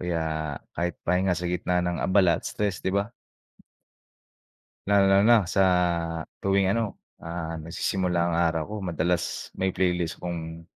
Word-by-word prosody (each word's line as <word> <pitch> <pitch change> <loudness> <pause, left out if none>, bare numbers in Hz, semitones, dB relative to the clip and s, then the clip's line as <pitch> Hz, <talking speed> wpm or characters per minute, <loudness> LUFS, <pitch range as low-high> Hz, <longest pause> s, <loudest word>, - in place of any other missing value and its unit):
kaya 80 -4 -2 0.2
kahit 85 +1 -2
pahinga 90 0 +2
sa 90 - -4
gitna 90 0 0
ng 90 -1 -1
abala 95 -3 +3
at - - -5
stress, 100 -5 -2
di - - -2
ba? 100 +3 0 1.8
Lalong-lalo 100 0 +5
na 120 0 +7
sa 95 - +3 0.8
tuwing 100 -1 +2
ano, 110 0 0 0.2
ah, 85 -1 -5
nagsisimula 90 +2 -1
ang 85 -1 0
araw 85 -2 +2
ko. - - -4
Madalas 85 0 -1
may 95 -1 0
playlist 90 -2 -1
akong 85 -1 -5
90 Hz, 140 wpm, -26 LUFS, 85-95 Hz, 1.8 s, na